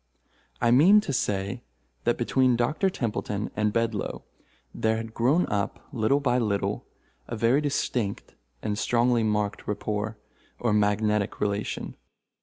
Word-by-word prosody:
I 120 -1 +3
mean 170 - +7
to 145 - -4
say, 100 -5 -1 0.4
that 120 - +2
between 125 +1 +2
Doctor 150 +11 +1
Templeton 105 - -3
and 105 0 +1
Bedloe 115 -2 -2 0.5
there 110 0 +1
had 115 0 -6
grown 135 +11 +3
up, 100 -2 -2
little 120 +3 +2
by 125 -3 +1
little, 105 -4 -1 0.4
a 120 - -4
very 115 +6 +3
distinct 125 -7 -2 0.3
and 105 0 -1
strongly 120 0 +2
marked 105 -1 -1
rapport, 105 +1 -2 0.4
or 115 -3 0
magnetic 105 0 +1
relation. 105 0 -2
115 Hz, 130 wpm, -26 LUFS, 105-125 Hz, 0.5 s, mean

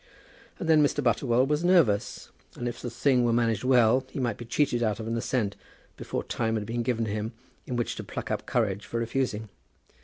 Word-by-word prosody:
And 170 - -5
then 160 -2 +6
Mr. 145 0 +1
Butterwell 120 +1 +2
was 150 +3 0
nervous, 165 - +2 0.2
and 120 - -4
if 120 -1 -5
the 120 - -4
thing 125 +1 +2
was 120 -1 +2
managed 115 -3 +1
well, 125 -1 +4
he 135 - -6
might 120 -5 -1
be 120 - -8
cheated 120 0 +1
out 110 -2 0
of 110 - -5
an 115 +1 -2
assent, 115 -3 -1 0.4
before - - -4
time 115 -1 -1
had 105 -2 -2
been 120 +2 -2
given 115 -1 0
him 110 +2 -3 0.3
in 125 - -3
which 120 -1 -1
to - - -5
pluck - - -6
up - - -3
courage 105 -4 0
for 115 - -2
refusing. 115 -2 -2
120 Hz, 210 wpm, -27 LUFS, 110-130 Hz, 0.4 s, then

